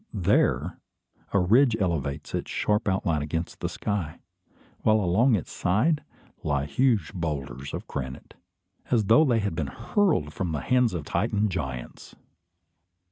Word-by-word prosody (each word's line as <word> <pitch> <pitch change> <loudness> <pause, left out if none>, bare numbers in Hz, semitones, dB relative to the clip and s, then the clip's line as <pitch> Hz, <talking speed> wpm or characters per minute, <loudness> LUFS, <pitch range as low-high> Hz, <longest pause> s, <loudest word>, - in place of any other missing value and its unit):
There, 95 -5 +1 0.5
a - - +2
ridge 115 +6 +4
elevates 80 -7 -2
its - - -3
sharp 105 +1 0
outline 85 -5 +1
against 80 +3 -4
the - - -2
sky; 95 -8 -3 0.6
while 110 0 +4
along 110 +7 +3
its 90 - -4
side, 125 - +1 0.4
lie 70 -2 0
huge 110 - +1
boulders 70 -7 -4
of - - -5
granite, 65 -1 -6 0.6
as 115 -4 +2
though 115 +9 +6
they 120 -5 +2
had 100 -3 -1
been 80 -3 -2
hurled 115 - 0
from 90 -4 -3
the 75 - -2
hands 125 - +2
of 80 -4 -4
Titan 105 +6 0
giants! 65 -9 -6
90 Hz, 140 wpm, -26 LUFS, 75-110 Hz, 0.6 s, though